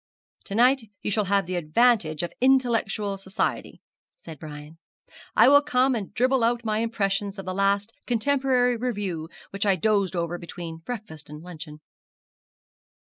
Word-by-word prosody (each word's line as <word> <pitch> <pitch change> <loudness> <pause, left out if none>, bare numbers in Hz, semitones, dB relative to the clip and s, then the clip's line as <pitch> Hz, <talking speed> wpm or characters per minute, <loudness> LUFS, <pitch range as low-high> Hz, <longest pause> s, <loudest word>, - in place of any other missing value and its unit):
'To 200 - -5
night 250 +4 +4 0.2
you - - -1
shall 210 0 +1
have 195 -1 +2
the 185 - -5
advantage 175 -1 +2
of 175 - -4
intellectual 230 -6 +2
society,' 195 +3 -3 0.4
said 160 -4 -10
Brian. 150 +1 -10 0.6
'I - - +7
will 285 0 +7
come 270 -3 +2
and 215 -5 -4
dribble 255 0 +2
out 235 0 +1
my 215 -1 0
impressions 205 -3 -1
of 195 - -7
the 185 - -3
last 200 +3 +1
Contemporary 250 0 +2
Review, 200 -9 -3 0.2
which 195 - -2
I 200 -2 +3
dozed 195 0 +1
over 170 0 -2
between 170 -1 -7
breakfast 165 -6 -7
and 150 +1 -9
luncheon.' 155 -3 -9
200 Hz, 150 wpm, -25 LUFS, 175-240 Hz, 0.6 s, I